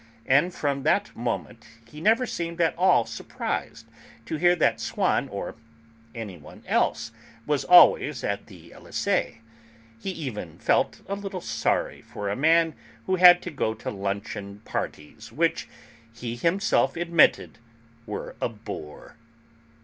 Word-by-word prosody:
And 145 +7 +3
from 140 -5 -2
that 200 +8 +1
moment 115 0 -4 0.2
he 150 +6 -11
never 225 +7 +3
seemed 170 -6 -5
at 165 -1 +2
all 180 -9 +4
surprised - - -5 0.4
to 160 - -3
hear 175 +3 +4
that 160 - +2
Swann, - - 0
or - - -5 0.6
anyone 100 -9 -9
else, 115 - 0 0.3
was 150 -2 0
'always 150 -6 +6
at 100 0 -3
the 85 -5 -15
Elysée'; 115 - -2 0.6
he 195 - -5
even 125 - -6
felt - - +1
a 200 - -3
little 195 -2 -5
sorry - - -1
for 100 -1 -6
a - - -1
man 160 +4 +3 0.3
who 185 0 +1
had 180 0 +8
to 175 - -5
go 110 -6 -1
to - - -5
luncheon 100 0 -5
parties 75 0 -6
which, - - 0 0.4
he 115 0 -6
himself 170 - +1
admitted, 170 -9 +3 0.5
were 105 - -6
a - - 0
bore. 105 -10 -9
140 Hz, 135 wpm, -25 LUFS, 105-175 Hz, 0.6 s, had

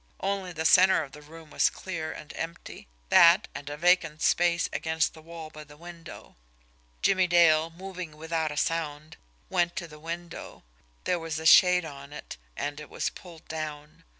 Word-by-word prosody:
Only 195 -2 -2
the 160 -1 -4
centre 185 0 +6
of 140 - -11
the 150 +2 -12
room 160 +1 -14
was - - +3
clear 160 -4 -5
and 150 -1 -10
empty; 165 +1 -7 0.2
that, 175 +4 +6
and 145 0 -7
a 145 - -6
vacant 165 -2 +2
space 170 -1 +2
against 160 0 0
the 160 - -14
wall 165 -1 -9
by 155 0 -10
the 150 0 -16
window. 170 0 -12 0.7
Jimmie 190 -2 +3
Dale, 165 -2 +4
moving 180 -2 -8
without 160 -1 -2
sound, 155 -1 -2 0.3
went 175 -2 0
to 170 - -4
the 150 -1 -13
window. 170 +2 -8 0.4
There 180 - 0
was 165 -1 -4
a 160 - -6
shade 180 +1 +7
on 140 -1 -10
it, 150 - -9 0.2
and 145 +1 -4
it 150 - -10
was - - -2
pulled 170 -3 -14
down. 150 -1 -7
165 Hz, 175 wpm, -27 LUFS, 155-175 Hz, 0.7 s, shade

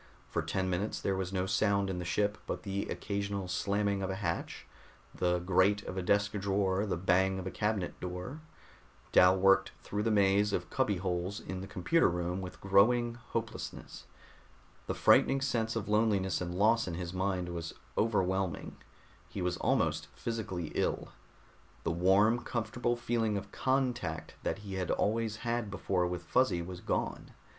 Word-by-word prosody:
For - - -1
ten 95 -1 -1
minutes 95 +4 -1
there 95 - 0
was 95 -1 -3
no 95 -1 0
sound 100 0 +2
in 95 -2 -3
the 90 - -4
ship 105 +4 0
but - - -4
the 100 -1 -2
occasional 100 -1 -3
slamming 100 +2 0
of 95 - -2
a 95 - -2
hatch, 100 +1 -3 0.5
the 90 0 +1
grate 95 +3 +2
of - - -6
a 95 - -1
desk 100 +3 +2
drawer, 100 0 0
the 95 - -1
bang 95 +2 +2
of 95 - -5
a 95 - -3
cabinet 105 -4 -1
door. 90 - -5 0.7
Dal 90 +1 +6
worked 95 0 +4
through 105 - -2
the 115 - +1
maze 100 -1 +3
of 90 -2 -2
cubby 105 -7 +1
holes 90 +2 -2
in 95 -1 -6
the 95 - -6
computer 105 - +2
room 90 +2 -2
with 90 -2 -8
growing 115 +5 +4
hopelessness. 115 -1 -6 0.8
The - - -1
frightening 135 - +5
sense 115 -4 0
of 110 -4 -2
loneliness 105 -4 +2
and 90 0 -3
loss 110 +4 +3
in 85 - -3
his 85 0 -5
mind 95 -1 -1
was 85 -1 -5 0.2
overwhelming; 95 -5 0 0.5
he 95 - -4
was 90 0 0
almost - - +1
physically 100 -8 -4
ill. - - -1 0.7
The - - 0
warm, 95 +7 +4
comfortable 120 +1 -1
feeling 115 -3 0
of 100 - -7
contact 125 -11 -1
that - - -1
he 100 - -6
had 95 -1 -2
always 110 0 0
had 120 -2 -1
before 95 -2 0
with 90 0 -4
Fuzzy 85 0 +2
was 90 0 -7
gone. - - -2
95 Hz, 165 wpm, -32 LUFS, 90-105 Hz, 0.8 s, Dal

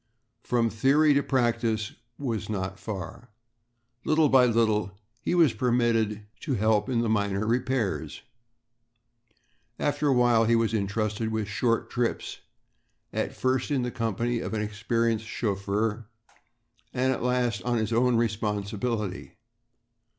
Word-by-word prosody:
From 115 -3 +1
theory 145 +7 +4
to 140 - +3
practice 115 -5 0 0.2
was 115 -8 -3
not 95 -2 -3
far. 110 +3 -7 0.7
Little 155 -1 +3
by 130 -2 +6
little 110 -4 +1 0.2
he 145 - -1
was 165 -8 +5
permitted 115 -3 +1
to 140 -6 -2
help 110 +1 +2
in 120 -3 +1
the 115 - 0
minor 100 -1 0
repairs. 120 -2 -1 1.5
After 145 0 0
a - - +4
while 120 -2 +4
he 115 +1 +3
was 115 -1 +1
entrusted 110 +1 -1
with 110 -2 -2
short 115 +3 0
trips, 120 -1 -2 0.7
at - - -2
first 130 +1 0
in 140 -4 +1
the 125 - -2
company 115 0 -1
of 115 - -4
an 105 - -1
experienced 110 +1 -1
chauffeur 105 +1 -2 0.8
and 130 +1 +1
at - - -5
last 125 -4 0
on 120 +4 0
his 110 0 -1
own 125 +1 +3
responsibility. 105 -1 -2
115 Hz, 130 wpm, -27 LUFS, 105-125 Hz, 1.5 s, by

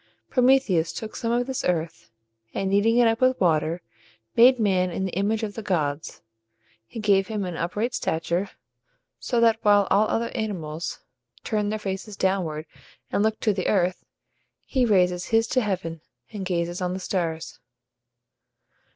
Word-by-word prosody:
Prometheus 250 -10 +3
took 220 -1 -7
some 230 - -2
of 240 +1 +1
this 265 0 -3
earth, 165 -7 -2 0.5
and 195 0 -1
kneading 215 +4 +3
it 240 -1 +6
up 225 +1 +1
with 255 0 +3
water, 165 -1 +1 0.5
made 250 +2 +7
man 185 -4 +2
in 190 +2 -3
the 190 - -3
image 210 +5 0
of 210 -2 -3
the 225 - -6
gods. 155 -7 -2 0.6
He 225 - -8
gave 200 -2 +3
him 210 -3 -3
an 180 -2 -4
upright 210 +9 -2
stature, 170 +4 -1 0.7
so 240 - -1
that 225 -1 +4
while 205 -2 +4
all 210 +2 +4
other 230 +2 -1
animals 175 -8 -4 0.4
turn 210 -2 -1
their 215 - -1
faces 200 0 -5
downward, 175 -5 -1 0.5
and - - +1
look 220 +1 +1
to 215 - +2
the 190 -2 -2
earth, 185 -2 +1 0.6
he 255 -3 +1
raises 180 -3 +2
his 225 0 +2
to 255 - +2
heaven, 175 -6 -3 0.3
and 205 -3 -5
gazes 175 0 -2
on 180 0 -1
the 190 - -4
stars. 165 -4 -3
195 Hz, 160 wpm, -25 LUFS, 175-225 Hz, 0.7 s, made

